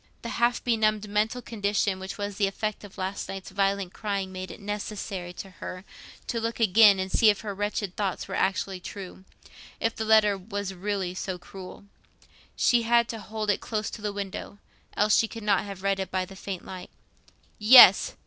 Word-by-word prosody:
The 235 - -4
half 235 +1 +1
benumbed 215 -3 +1
mental 215 +4 -1
condition 205 -3 -1
which 190 0 -7
was 205 -1 -4
the 200 - +2
effect 215 +2 -4
of 205 - -12
the 195 - -7
last 190 +1 -4
night's 195 -1 -7
violent 195 -1 0
crying 200 -3 -3
made 185 0 -6
it - - -10
necessary 205 -3 -5
to 190 +2 -9
her 185 +2 -7 0.4
to 230 - -2
look 230 +1 -3
again 210 -1 +6
and 190 0 -3
see 220 - +5
if 205 - +1
her 210 -3 -4
wretched 205 -1 -3
thoughts 195 -3 -2
were 195 - -7
actually 190 0 -1
true—if 190 +4 -8
the 220 - -3
letter 215 -2 +4
was 200 0 -5
really 190 -1 -3
so 185 0 -4
cruel. 190 +2 -11 0.7
She 240 -2 +3
had 235 0 +3
to 225 - -5
hold 215 0 -2
it 200 - -2
close 215 -1 -3
to 220 - -8
the 210 0 -2
window, 200 0 -6 0.4
else 210 +1 +4
she 225 - +3
could 225 0 -9
not 205 -1 +2
have 195 -2 -8
read 195 0 +1
it 190 -2 -3
by 185 0 -1
the 195 - -13
faint 190 -1 -6
light. 185 -1 -8 0.7
Yes! 240 +4 +8
200 Hz, 195 wpm, -27 LUFS, 190-215 Hz, 0.7 s, Yes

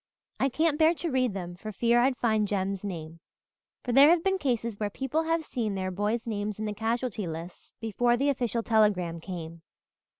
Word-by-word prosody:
I 270 - +2
can't 310 +3 +1
bear 320 +2 +5
to 335 -1 -3
read 255 -5 +1
them 175 -2 -5
for 215 +5 -7
fear 235 +3 +2
I'd 255 0 +2
find 220 -3 +1
Jem's 195 -1 -2
name 165 -4 -6 0.6
for 245 - -2
there 275 +4 +8
have 335 0 +4
been 385 0 +1
cases 235 - -1
where 210 -1 -1
people 270 +8 -1
have 330 -1 0
seen 220 -8 -2
their 185 -1 -2
boys' 210 +5 -1
names 210 -2 -3
in 215 - -3
the 210 - -2
casualty 225 -2 -2
lists 165 +2 -8
before 240 +2 +1
the 280 +3 +1
official 240 -4 -1
telegram 200 -7 +2
came. 165 -2 -7
220 Hz, 195 wpm, -28 LUFS, 195-255 Hz, 0.6 s, there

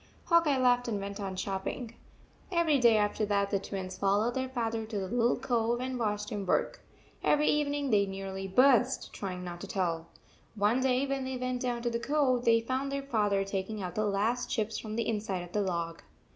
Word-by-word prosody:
Hawk 335 -1 +4
Bye 285 -3 +2
laughed 245 -1 +3
and 215 -3 -1
went 200 +1 -5
on 195 -2 -4
chop 190 0 -3
ping. 240 -3 -4 0.6
Every 335 -5 +3
day 235 -3 +6
after 210 +1 +1
that 200 -1 +1
the 200 - +2
Twins 190 -1 -6
fol 195 +1 +3
lowed 240 +2 0
their 260 0 -2
father 230 -3 -2
to 220 -1 -5
the 190 -1 -2
little 240 +2 +2
cove 235 -1 0
and 255 0 -3
watched 210 -2 -1
him 205 -2 -3
work. 185 - 0 0.4
Every 300 0 +3
evening 290 -2 +1
they 200 -2 +4
nearly 195 0 -5
burst 250 +5 +3
trying 185 -2 -5
not 175 -1 -7
to 200 - -6
tell. 170 -4 -1 0.5
One 210 +4 +2
day 260 +1 +2
when 275 -1 -2
they 260 0 -3
went 255 0 -2
down 240 -2 -2
to 240 - 0
the 235 - -1
cove, 255 -1 +1
they 230 0 +5
found 260 +4 -2
their 275 0 -2
father 210 -7 +1
taking 195 +1 -3
out 180 - -4
the 215 - 0
last 215 +5 0
chips 220 -1 -1
from 215 -1 -6
the 230 - -1
inside 205 -5 -2
of 175 - -11
the 210 - 0
log. 170 -3 -2
220 Hz, 215 wpm, -30 LUFS, 195-255 Hz, 0.6 s, day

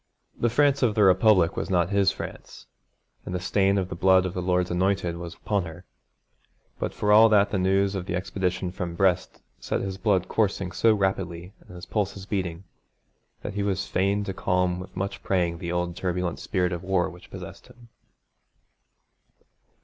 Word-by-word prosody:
The 120 - +1
France 140 +3 +3
of 115 -5 +2
the 105 - +4
Republic 95 -2 +4
was - - -3
not 90 0 +1
his 100 -2 +3
France, - - -9 0.6
and 90 - -5
the - - -1
stain 100 +2 +2
of 95 -2 -1
the - - -5
blood 95 +1 +4
of 90 - -3
the 90 - -3
Lord's 90 0 0
Anointed 90 -1 0
was 85 -1 -7
upon 100 -4 -1
her, 85 +2 -10 0.9
but - - -2
for 105 - 0
all 110 +2 +8
that 105 -2 +4
the 95 - 0
news 95 +1 +2
of 95 -2 -4
the 85 - -2
expedition 90 0 -2
from 90 -2 -5
Brest 90 -1 0 0.2
set - - -2
his 95 -1 -5
blood 100 -4 +1
coursing 100 -4 0
so 110 +2 +3
rapidly 95 -2 -2
and 90 - -15
his 90 - -9
pulses 100 -2 -3
beating, 95 -3 -3 0.8
that 105 - -5
he 100 - -2
was 100 -2 -1
fain 100 +2 0
to 95 - -4
calm 90 -1 0
with 90 - -10
much 100 +1 -3
praying 85 -3 0
the 85 0 -4
old 90 -1 -2
turbulent 90 -1 -2
spirit 90 -3 -1
of 85 -1 -4
war 95 -1 +1
which 90 - -12
possessed - - -10
him. 120 -1 -18
95 Hz, 185 wpm, -25 LUFS, 90-100 Hz, 0.9 s, all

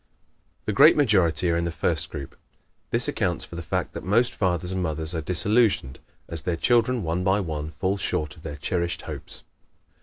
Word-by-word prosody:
The - - -1
great - - +7
majority 95 - +3
are - - +1
in 85 0 0
the 85 - -2
first 80 -1 0
group. 70 -3 -8 0.5
This - - +1
accounts - - -1
for - - -11
the 85 - -5
fact 85 - -3
that - - -7
most 115 +7 +2
fathers 90 -2 -1
and 95 0 -2
mothers 80 -1 -2
are 80 - -2
disillusioned, 90 - +2 0.3
as 80 -2 -4
their 85 0 -2
children, 120 +3 +2
one 85 +2 -1
by 95 +2 +2
one, 80 -5 -4
fall 95 +4 -2
short 80 -3 -2
of 80 - -16
their 75 -2 -7
cherished 85 +3 -2
hopes. - - -8
85 Hz, 190 wpm, -25 LUFS, 80-95 Hz, 0.5 s, great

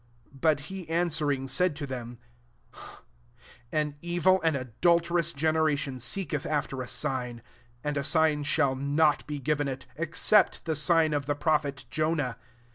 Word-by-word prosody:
39 135 - -16
But 155 -3 +3
he 180 +2 -8
answering 150 -5 0
said 150 +5 +1
to 150 -1 -5
them, 120 -3 -6 0.8
" 120 0 -25
An 150 -2 -1
evil 175 +2 +2
and 160 -3 +2
adulterous 170 +6 +1
gene 155 +2 0
ration 150 -4 0
seeketh 150 +4 -2
after 145 -3 -2
a 125 - -5
sign; 125 -2 -3 0.4
and 150 0 -2
a 140 - 0
sign 160 -1 +2
shall 145 -1 +2
not 145 +3 +1
be 150 -1 -4
given 145 +1 0
it, 130 -1 -5
except 170 +6 +2
the 160 -1 -1
sign 155 +1 +3
of 145 -2 -1
the 145 - +1
prophet 145 -3 0
Jonah. 155 -4 0
150 Hz, 155 wpm, -28 LUFS, 135-160 Hz, 0.8 s, But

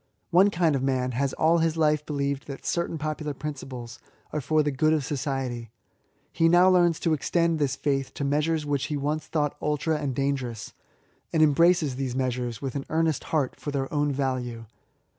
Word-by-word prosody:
One 185 +4 +6
kind 165 -5 +2
of 135 - -1
man 130 -1 0
has 135 +3 0
all 165 +2 +3
his 165 0 +1
life 150 -1 +2
believed 140 -2 -2
that 140 -2 -8
certain 170 -1 -1
popular 155 -1 -3
pruiciples 130 -4 -7 0.3
are 150 - -1
for 155 +3 +2
the 145 - 0
good 155 +4 +2
of 150 -4 0
society; 130 -5 -3 0.6
he 165 0 +3
now 180 +2 +6
learns 175 -3 +3
to 165 - +2
extend 165 +2 +1
this 140 -3 +1
faith 135 -2 -1
to 145 - -3
measures 150 +2 +1
which 145 -2 0
he 150 - -2
once 150 +2 -2
thought 150 -3 -1
idtra 150 +1 0
and 135 -3 -2
dangerous, 135 -5 -2 0.6
atid 155 - +4
embraces 155 -2 +3
these 130 -2 -3
measures 125 -3 -2
with 135 -2 -3
an 140 - -4
earnest 160 -2 0
heart, 145 -5 0
for - - -5
their 140 -1 -3
own 145 -1 +1
value. 130 -4 -2
145 Hz, 185 wpm, -26 LUFS, 135-155 Hz, 0.6 s, One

